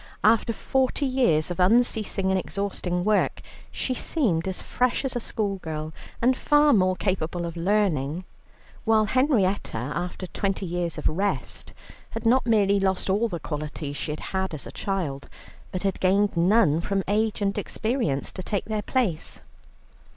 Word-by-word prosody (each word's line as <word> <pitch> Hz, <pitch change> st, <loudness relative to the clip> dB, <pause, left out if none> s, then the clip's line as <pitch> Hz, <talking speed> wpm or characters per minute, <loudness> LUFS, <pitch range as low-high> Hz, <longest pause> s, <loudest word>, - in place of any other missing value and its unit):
After 225 Hz, +2 st, +4 dB
forty 265 Hz, +4 st, 0 dB
years 240 Hz, -, +2 dB
of 175 Hz, -, -5 dB
unceasing 210 Hz, -1 st, +2 dB
and 190 Hz, -, +2 dB
exhausting 180 Hz, -2 st, -2 dB
work 215 Hz, -1 st, +2 dB, 0.3 s
she 260 Hz, -, -2 dB
seemed 210 Hz, -, 0 dB
as 190 Hz, -, -2 dB
fresh 250 Hz, +2 st, 0 dB
as 260 Hz, -, -2 dB
a -, -, +1 dB
schoolgirl, 165 Hz, -9 st, -3 dB, 0.3 s
and 255 Hz, +2 st, +4 dB
far 295 Hz, +2 st, +4 dB
more 185 Hz, -3 st, +3 dB
capable 175 Hz, -3 st, -1 dB
of 170 Hz, 0 st, -5 dB
learning, 175 Hz, -4 st, 0 dB, 0.6 s
while 220 Hz, -1 st, +4 dB
Henrietta 210 Hz, -, +1 dB
after 175 Hz, +10 st, -4 dB
twenty 195 Hz, +1 st, -2 dB
years 175 Hz, -1 st, -2 dB
of -, -, 0 dB
rest, 195 Hz, +6 st, -2 dB, 0.4 s
had 225 Hz, +1 st, -6 dB
not 245 Hz, +2 st, +4 dB
merely 200 Hz, -3 st, +4 dB
lost 190 Hz, 0 st, 0 dB
all 210 Hz, +4 st, +2 dB
the 175 Hz, -6 st, -4 dB
qualities 150 Hz, -1 st, -5 dB
she 150 Hz, -, -3 dB
had 150 Hz, -, -4 dB
had 190 Hz, -3 st, -1 dB
as 140 Hz, -, -8 dB
a -, -, -8 dB
child, 165 Hz, -9 st, -3 dB, 0.4 s
but 185 Hz, -, -4 dB
had 195 Hz, -2 st, 0 dB
gained 195 Hz, +2 st, +2 dB
none 170 Hz, -2 st, +4 dB
from 195 Hz, +2 st, -1 dB
age 215 Hz, +2 st, +1 dB
and 200 Hz, -1 st, 0 dB
experience 220 Hz, -, -1 dB
to 185 Hz, -, -6 dB
take 200 Hz, +1 st, -2 dB
their 215 Hz, 0 st, -2 dB
place. 210 Hz, -9 st, -1 dB
195 Hz, 160 wpm, -25 LUFS, 170-220 Hz, 0.6 s, After